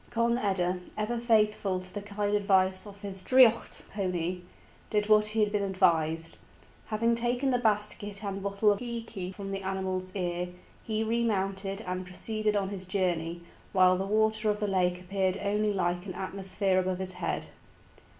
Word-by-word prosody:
Conn 235 +1 +1
eda, 185 -4 0 0.2
ever 225 +3 -1
faithful 215 -5 +2
to 185 0 -11
the 205 - -4
kind 205 0 -2
advice 190 -1 +2
of 200 0 -12
his 195 -2 -5
draoidheacht 245 0 +4
pony, 180 -3 -2 0.5
did 210 -1 +1
what 215 0 +5
he 215 +1 0
had 210 -1 +2
been 210 -1 +1
advised. 165 -4 +1 0.5
Having 230 +2 +1
taken 245 +3 +1
the 250 - +2
basket 210 -2 0
and 195 -1 -3
bottle 200 +1 +2
of 200 - 0
íce 230 -6 -5
from 195 -1 -6
the 195 0 -3
animal's 190 -1 -3
ear, 180 -1 -1 0.3
he 220 0 -1
remounted 195 -3 -1
and 185 -3 -3
proceeded 215 +3 -2
on 195 -2 0
his 190 -2 -6
journey, 175 -3 -1 0.3
while 185 -1 +6
the 190 +1 -2
water 220 +1 +2
of 210 0 0
the 210 - 0
lake 180 -2 +1
appeared 190 0 -1
only 210 +1 +1
like 180 -1 -1
an 185 - -5
atmosphere 190 0 0
above 185 0 0
his 190 0 -2
head. 180 -1 -3
195 Hz, 170 wpm, -29 LUFS, 185-215 Hz, 0.5 s, while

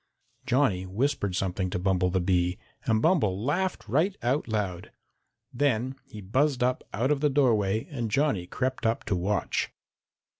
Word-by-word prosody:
Johnny 125 -8 +2
whispered 100 -2 -1
something 95 0 -1
to 95 - -2
Bumble 90 0 +1
the 95 +1 +1
Bee, 90 0 +1 0.3
and 110 -1 +2
Bumble 120 - +3
laughed 185 +7 -1
right 165 - +1
out 130 +5 +1
loud. 100 -6 -3 0.6
Then 130 -1 +1
he 105 -3 -9
buzzed 130 +6 +1
up 125 +1 +1
out 125 +6 0
of 145 - +2
the 150 +1 +2
doorway, 110 -7 +2
and 120 -9 -3
Johnny 105 -7 +1
crept 130 +1 -1
up 115 - 0
to 100 - -1
watch. 95 +4 -1
115 Hz, 155 wpm, -27 LUFS, 95-140 Hz, 0.6 s, Bumble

